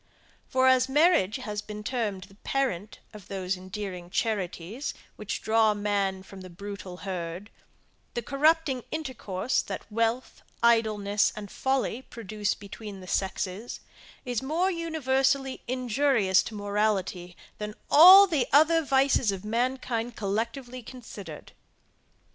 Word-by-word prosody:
For 260 Hz, 0 st, +3 dB
as 260 Hz, 0 st, +4 dB
marriage 295 Hz, -, +4 dB
has 210 Hz, -5 st, -4 dB
been 210 Hz, 0 st, -8 dB
termed 210 Hz, -6 st, -2 dB
the 195 Hz, -, -16 dB
parent 215 Hz, -3 st, -2 dB, 0.2 s
of 210 Hz, -3 st, -12 dB
those 190 Hz, -1 st, -2 dB
endearing 185 Hz, -1 st, -7 dB
charities, 205 Hz, -, -2 dB, 0.2 s
which 210 Hz, -, -5 dB
draw 220 Hz, -1 st, +3 dB
man 200 Hz, -2 st, -1 dB
from 195 Hz, 0 st, -12 dB
the 185 Hz, -, -10 dB
brutal 195 Hz, 0 st, -8 dB
herd, 180 Hz, +1 st, -5 dB, 0.6 s
the 240 Hz, -, -2 dB
corrupting 285 Hz, 0 st, +2 dB
intercourse 260 Hz, -8 st, -2 dB
that -, -, -6 dB
wealth, 230 Hz, +3 st, -1 dB, 0.2 s
idleness, 215 Hz, -3 st, +3 dB
and 205 Hz, -2 st, -8 dB
folly 265 Hz, -2 st, -1 dB
produce 215 Hz, -4 st, -3 dB
between 205 Hz, 0 st, -9 dB
the 185 Hz, -, -11 dB
sexes, 190 Hz, +4 st, -3 dB, 0.5 s
is 245 Hz, -3 st, -2 dB
more 330 Hz, +8 st, 0 dB
universally 270 Hz, -5 st, 0 dB
injurious 250 Hz, -6 st, +2 dB
to 220 Hz, -, -7 dB
morality, 200 Hz, -3 st, -1 dB, 0.2 s
than 210 Hz, 0 st, -5 dB, 0.2 s
all 370 Hz, +6 st, +10 dB
the 300 Hz, -10 st, 0 dB
other 315 Hz, +3 st, +5 dB
vices 265 Hz, -5 st, +2 dB
of 195 Hz, +1 st, -6 dB
mankind 240 Hz, 0 st, -1 dB
collectively 235 Hz, +5 st, -3 dB
considered. 230 Hz, -4 st, -10 dB
220 Hz, 125 wpm, -27 LUFS, 200-265 Hz, 0.6 s, all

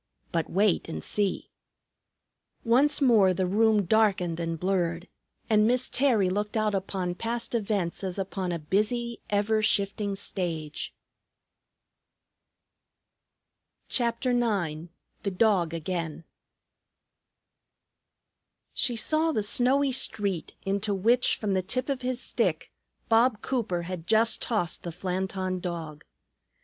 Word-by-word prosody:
But 165 Hz, -2 st, -1 dB
wait 195 Hz, 0 st, +1 dB
and 80 Hz, -, -5 dB
see." 205 Hz, -2 st, -2 dB, 1.1 s
Once 265 Hz, +6 st, +3 dB
more 210 Hz, -8 st, +5 dB
the 185 Hz, -, 0 dB
room 215 Hz, +2 st, +3 dB
darkened 185 Hz, -5 st, +2 dB
and 165 Hz, -1 st, -3 dB
blurred, 175 Hz, -2 st, -1 dB, 0.4 s
and 215 Hz, -1 st, +4 dB
Miss 250 Hz, +1 st, +3 dB
Terry 245 Hz, -8 st, +2 dB
looked 205 Hz, +4 st, -2 dB
out 215 Hz, -1 st, +1 dB
upon 190 Hz, -2 st, -2 dB
past 235 Hz, +5 st, -2 dB
events 200 Hz, -6 st, -1 dB
as 185 Hz, -1 st, -3 dB
upon 190 Hz, -1 st, -3 dB
a 170 Hz, -, -1 dB
busy, 215 Hz, +8 st, -1 dB
ever 210 Hz, +1 st, +1 dB
shifting 200 Hz, -1 st, 0 dB
stage. 165 Hz, -6 st, -3 dB, 2.9 s
CHAPTER 240 Hz, +1 st, 0 dB
IX 190 Hz, -10 st, -1 dB, 0.3 s
THE 200 Hz, -, -1 dB
DOG 190 Hz, -4 st, +2 dB
AGAIN 165 Hz, -1 st, -4 dB, 2.5 s
She 245 Hz, -3 st, +2 dB
saw 310 Hz, +8 st, +2 dB
the 215 Hz, -9 st, -1 dB
snowy 260 Hz, +6 st, +3 dB
street, 200 Hz, -8 st, 0 dB
into 200 Hz, +1 st, 0 dB
which, 235 Hz, +6 st, +3 dB
from 205 Hz, -3 st, -2 dB
the 190 Hz, -, +1 dB
tip 255 Hz, +9 st, -2 dB
of 270 Hz, -2 st, -2 dB
his 250 Hz, 0 st, -2 dB
stick, -, -, -1 dB, 0.4 s
Bob 225 Hz, 0 st, +3 dB
Cooper 215 Hz, -9 st, -1 dB
had 175 Hz, -1 st, -6 dB
just 225 Hz, 0 st, +3 dB
tossed 210 Hz, -8 st, -1 dB
the 170 Hz, -, -5 dB
Flanton 185 Hz, +1 st, -3 dB
Dog. 165 Hz, -4 st, -6 dB
200 Hz, 115 wpm, -27 LUFS, 180-230 Hz, 2.9 s, more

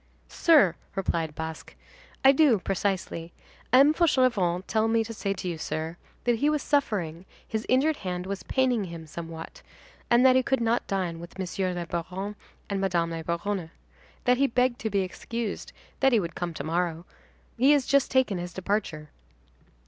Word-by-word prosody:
"Sir," 295 Hz, -, +5 dB, 0.2 s
replied 165 Hz, -5 st, -1 dB
Basque, 160 Hz, 0 st, -7 dB, 0.5 s
"I 270 Hz, -, +10 dB
do, 275 Hz, -5 st, +5 dB
precisely. 185 Hz, -3 st, -2 dB, 0.4 s
M. 275 Hz, +4 st, +7 dB
Fauchelevent 240 Hz, -, +2 dB
told 220 Hz, 0 st, +1 dB
me 225 Hz, 0 st, +3 dB
to 230 Hz, +1 st, -7 dB
say 200 Hz, -2 st, -2 dB
to 185 Hz, -, -6 dB
you, 170 Hz, -3 st, -3 dB
sir, 160 Hz, +1 st, -3 dB, 0.3 s
that 240 Hz, -1 st, +2 dB
he 290 Hz, +6 st, +2 dB
was 300 Hz, -2 st, 0 dB
suffering, 190 Hz, -, 0 dB, 0.2 s
his 220 Hz, 0 st, -3 dB
injured 280 Hz, +4 st, +3 dB
hand 180 Hz, -1 st, -4 dB
was 195 Hz, 0 st, -4 dB
paining 250 Hz, -5 st, +1 dB
him 170 Hz, -2 st, -8 dB
somewhat, 165 Hz, +1 st, -8 dB, 0.5 s
and 240 Hz, +2 st, +5 dB
that 255 Hz, -1 st, +7 dB
he 260 Hz, -, +5 dB
could 265 Hz, +1 st, 0 dB
not 230 Hz, +1 st, 0 dB
dine 180 Hz, -4 st, -2 dB
with 170 Hz, +2 st, -11 dB
Monsieur 185 Hz, 0 st, -2 dB
le 175 Hz, -1 st, -3 dB
Baron 185 Hz, +5 st, -4 dB, 0.3 s
and 200 Hz, -1 st, -2 dB
Madame 175 Hz, -3 st, +1 dB
la 165 Hz, 0 st, -4 dB
Baronne. 170 Hz, +1 st, -2 dB, 0.5 s
That 250 Hz, 0 st, +3 dB
he 275 Hz, +1 st, +3 dB
begged 250 Hz, 0 st, +1 dB
to 220 Hz, -, -2 dB
be 200 Hz, -1 st, +1 dB
excused, 220 Hz, +4 st, -4 dB, 0.3 s
that 270 Hz, 0 st, +4 dB
he 235 Hz, -, +4 dB
would 170 Hz, -4 st, -4 dB
come 170 Hz, -1 st, -4 dB
to -, -, -4 dB
morrow. 170 Hz, +1 st, -1 dB, 0.5 s
He 265 Hz, +5 st, +5 dB
has 285 Hz, -3 st, +2 dB
just 280 Hz, -1 st, +3 dB
taken 255 Hz, -8 st, +2 dB
his 175 Hz, 0 st, -6 dB
departure." 185 Hz, -6 st, -2 dB
195 Hz, 175 wpm, -27 LUFS, 170-250 Hz, 0.5 s, I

